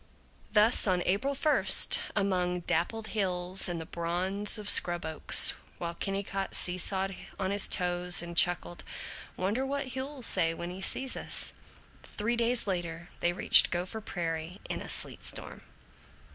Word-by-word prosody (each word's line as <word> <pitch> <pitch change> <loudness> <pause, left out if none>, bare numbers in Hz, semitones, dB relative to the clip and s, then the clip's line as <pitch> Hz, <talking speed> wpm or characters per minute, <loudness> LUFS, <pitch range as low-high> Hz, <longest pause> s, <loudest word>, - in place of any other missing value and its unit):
Thus 215 +2 +3
on 180 -2 0
April 215 +10 -1
first, 300 +2 +4 0.2
among 180 -3 -1
dappled 220 +7 -3
hills 185 -3 0
and 175 -1 -4
the 160 - -8
bronze 185 +6 0
of 210 -1 -8
scrub 175 -3 +4
oaks, 160 -1 +5 0.2
while 170 -1 -6
Kennicott 195 +1 -5
seesawed 190 +2 -2 0.2
on 190 -1 -2
his 200 0 +1
toes 180 -1 +1
and 170 0 -9
chuckled, 175 -1 +2 0.5
"Wonder 205 +8 -2
what 270 -1 -5
Hugh'll 265 0 -6
say 165 -6 +3
when 175 +1 -7
he 185 +1 -9
sees 260 +6 -1
us?" - - -2 0.5
Three 230 +3 -3
days 235 +1 -1
later 175 -2 -5
they 175 - 0
reached 175 - +7
Gopher 180 +5 -5
Prairie 170 -2 -6
in - - -5
a - - -9
sleet - - -3
storm. - - -3
185 Hz, 145 wpm, -28 LUFS, 175-210 Hz, 0.5 s, reached